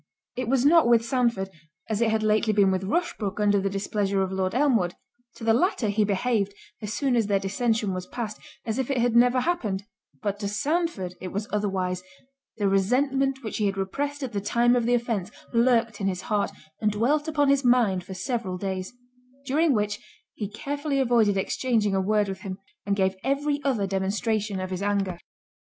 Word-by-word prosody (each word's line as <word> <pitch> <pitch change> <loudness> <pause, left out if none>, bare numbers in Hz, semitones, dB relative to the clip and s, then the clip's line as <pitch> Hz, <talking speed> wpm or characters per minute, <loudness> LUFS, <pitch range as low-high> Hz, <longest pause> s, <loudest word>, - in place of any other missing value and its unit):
It 255 -1 -3
was 265 0 +2
not 325 -2 +6
with 230 -1 +4
Sandford, 235 -7 0 0.4
as 215 0 -1
it 230 - +3
had 220 0 +1
lately 215 0 +2
been 200 -2 +4
with 190 0 -1
Rushbrook 210 - -1
under 205 -1 +3
the 195 - 0
displeasure 195 0 0
of 190 - -3
Lord 190 +1 -1
Elmwood—to 240 -2 -1
the 225 0 +4
latter 250 - +1
he 210 +1 +2
behaved, 205 0 0 0.3
as 210 -1 -4
soon 265 +2 +1
as 225 -3 +2
their 200 -1 +3
dissension 210 +1 0
was 185 0 -5
past, 220 -4 -5 0.3
as 225 +2 -2
if 265 - -1
it 275 - 0
had 240 -1 +2
never 245 +1 +5
happened—but 210 - -3
to 200 - -2
Sandford 210 - -1
it 185 - -4
was 205 +3 -4
otherwise—the 195 +4 -3
resentment 265 +7 +1
which 215 - -4
he 210 - +1
had 195 0 -2
repressed 285 +9 -2
at 255 - -4
the 200 - -1
time 240 +4 +3
of 240 -2 +1
the 245 - +4
offence, 230 -6 -1 0.2
lurked 230 -3 +2
in 195 - +1
his 185 -1 -2
heart, 210 -2 0 0.3
and 215 -1 +2
dwelt 280 +9 +1
upon 290 -3 +2
his 280 0 +3
mind 235 -7 +3
for 190 - -8
several 190 -1 -2
days; 190 +1 -4 0.5
during 300 +4 +2
which, 210 -3 0 0.3
he 205 -3 -4
carefully 285 +5 -3
avoided 230 -6 +3
exchanging 215 0 0
a 190 - +2
word 210 +1 +2
with 190 -1 -5
him, 190 -2 -6 0.3
and 200 - +2
gave 190 -1 +1
every 285 +2 0
other 245 -8 +1
demonstration 200 +1 -1
of 185 0 -4
his 185 0 -3
anger. 200 -3 -1
215 Hz, 190 wpm, -26 LUFS, 195-250 Hz, 0.5 s, not